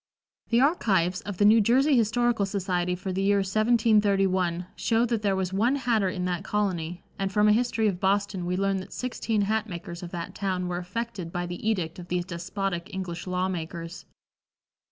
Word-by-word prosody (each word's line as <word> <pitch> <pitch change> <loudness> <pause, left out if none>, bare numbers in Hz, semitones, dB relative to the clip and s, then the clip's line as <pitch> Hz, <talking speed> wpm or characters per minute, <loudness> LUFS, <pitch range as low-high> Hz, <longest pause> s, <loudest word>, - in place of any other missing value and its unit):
The 235 +1 +4
archives 190 - +2
of 205 -3 -6
the 205 - +3
New 220 +2 +7
Jersey 265 +7 +4
Historical 230 -2 +2
Society 180 -2 -1
for 185 +1 -4
the 190 - -1
year 200 +1 +3
1731 195 -4 +2
show 230 +1 +2
that 230 -2 -1
there 200 -2 +1
was 190 -1 -2
one 235 +8 +2
hatter 230 -7 +1
in 180 0 -3
that 180 -2 -2
colony, 180 -5 -2 0.2
and 195 0 -1
from 210 +1 +3
a - - +6
history 230 -1 +1
of 185 -4 -1
Boston 195 -2 0
we 180 +1 -1
learn 195 0 +1
that 190 +1 -7
sixteen 230 -3 -1
hat 220 +2 0
makers 170 -1 -7
of 175 - -6
that 175 +2 -6
town 185 -2 -2
were 175 0 -2
affected 190 -1 -5
by 175 0 -2
the 175 +5 -3
edict 180 -6 -2
of 175 - -9
these 175 0 -1
despotic 185 +1 -4
English 185 -2 -5
law 185 0 0
makers. 170 -1 -6
195 Hz, 190 wpm, -27 LUFS, 180-215 Hz, 0.2 s, New